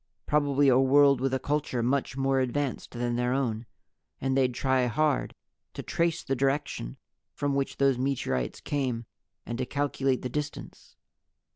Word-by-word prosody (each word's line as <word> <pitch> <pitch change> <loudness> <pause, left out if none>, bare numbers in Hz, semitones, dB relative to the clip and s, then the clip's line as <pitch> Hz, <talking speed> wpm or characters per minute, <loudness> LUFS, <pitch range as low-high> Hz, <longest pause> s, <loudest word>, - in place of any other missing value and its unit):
Probably 145 -1 +2
a 130 -1 +5
world 140 0 +5
with 135 0 +1
a 130 - +1
culture 140 -3 -1
much 130 +1 0
more 135 0 +2
advanced 130 +1 -2
than 120 0 -2
their 125 +1 +1
own. 120 -4 -1 0.5
And 135 0 0
they'd 130 -2 +2
try 130 -1 +2
hard 150 +3 0 0.4
to - - -5
trace 170 -1 0
the 135 - -1
direction 135 - -1 0.4
from 145 -1 -1
which 140 0 -1
those 135 -2 +3
meteorites 125 - -1
came, 130 -5 -2 0.4
and 120 +1 -5
to 130 - 0
calculate 135 -2 0
the - - -1
distance. 150 +3 -6
135 Hz, 155 wpm, -28 LUFS, 125-140 Hz, 0.5 s, a